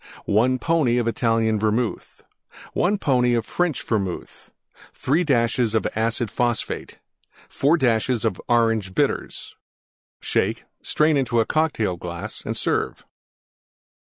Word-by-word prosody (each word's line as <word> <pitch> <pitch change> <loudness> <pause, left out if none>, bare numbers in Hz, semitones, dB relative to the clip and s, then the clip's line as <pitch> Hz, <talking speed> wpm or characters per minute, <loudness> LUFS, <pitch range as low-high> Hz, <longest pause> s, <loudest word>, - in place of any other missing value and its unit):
1 125 +5 +2
pony 145 -4 +1
Italian 115 -2 +1
Vermouth. 110 +2 -2 0.5
1 200 +4 +1
pony 125 -7 +2
French 175 +6 -1
Vermouth. 100 -6 -4 0.4
3 155 +7 +1
dashes 120 -5 +1 0.2
Acid 115 0 -1
Phosphate. 120 -2 -2 0.5
4 150 +5 +2
dashes 120 -2 +1 0.2
Orange 115 -5 +1
Bitters. - - -1 0.7
Shake; - - -1 0.2
strain 155 -1 +2
into 120 -4 +1
Cocktail 145 - 0
glass 85 0 -6
and - - -3
serve. - - -1
120 Hz, 100 wpm, -23 LUFS, 110-135 Hz, 0.7 s, 1